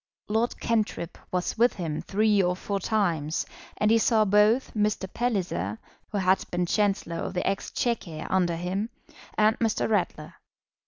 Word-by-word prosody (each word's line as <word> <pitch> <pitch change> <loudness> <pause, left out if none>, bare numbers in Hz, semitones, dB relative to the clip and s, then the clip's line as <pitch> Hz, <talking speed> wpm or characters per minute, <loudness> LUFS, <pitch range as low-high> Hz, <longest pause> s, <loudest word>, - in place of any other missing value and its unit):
Lord 225 +3 0
Cantrip 215 -7 -1
was 180 +4 -2
with 240 +2 +5
him 160 -5 -3
three 210 0 +2
or 180 -1 +1
four 200 +2 -3
times, 170 -7 0 0.3
and 210 +1 +3
he 230 - +5
saw 220 -1 +3
both 210 +5 +3
Mr. 210 -2 0
Palliser, 180 - -1 0.3
who 210 - -1
had 190 0 +3
been 175 0 0
Chancellor 195 -3 0
of 180 - -4
the 180 - -1
Exchequer 195 -4 -2
under 180 -3 +1
him, 185 +6 -2 0.5
and 215 +1 +3
Mr. 225 -2 +1
Ratler. 180 -7 -1
200 Hz, 150 wpm, -27 LUFS, 175-215 Hz, 0.5 s, with